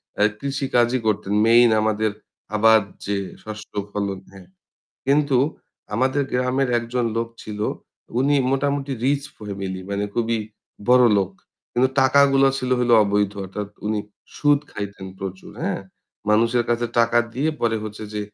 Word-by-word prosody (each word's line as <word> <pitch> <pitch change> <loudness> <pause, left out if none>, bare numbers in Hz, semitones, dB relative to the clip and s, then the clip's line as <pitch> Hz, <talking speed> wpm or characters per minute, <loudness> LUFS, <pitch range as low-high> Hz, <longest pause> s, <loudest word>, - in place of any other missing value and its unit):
অ্যা 105 - +3
কৃষি 140 0 -2
কাজই 120 +1 +3
করতেন। 100 -1 0
মেইন 120 +1 +6
আমাদের 110 0 +1 0.4
আবার 110 +1 +6 0.3
যে 100 0 -1 0.3
শস্য 110 0 -8 0.2
ফলন 100 -2 -2
হ্যাঁ। 95 -2 -14 0.6
কিন্তু 140 -1 +3 0.6
আমাদের 130 +5 +1
গ্রামের 125 +1 +1
একজন 120 +1 -2
লোক 115 0 -1
ছিল। 105 -1 -7 0.6
উনি 140 +2 +3 0.2
মোটামুটি 140 0 0
রিচ 140 +1 +2 0.2
ফ্যামিলি 95 -3 -5
মানে 100 +1 -1
খুবই 115 -1 0 0.5
বড় 125 0 +7
লোক। 95 0 -1 0.4
কিন্তু 125 +2 +3
টাকাগুলো 135 0 +5
ছিল 130 -1 -3
হইলো 120 -1 +4
অবৈধ 100 0 +1
অর্থাৎ 100 +2 -5 0.2
উনি 105 0 0 0.4
সুদ 145 -1 +3
খাইতেন 100 -2 -6
প্রচুর, 95 -1 -7
হ্যাঁ? - - -1 0.5
মানুষের 115 +3 +3
কাছে 120 0 +1
টাকা 115 0 +4 0.2
দিয়ে 145 +5 +1
পরে 115 -1 +1
হচ্ছে 110 0 -7
যে 105 - -1
115 Hz, 140 wpm, -22 LUFS, 105-130 Hz, 0.6 s, বড়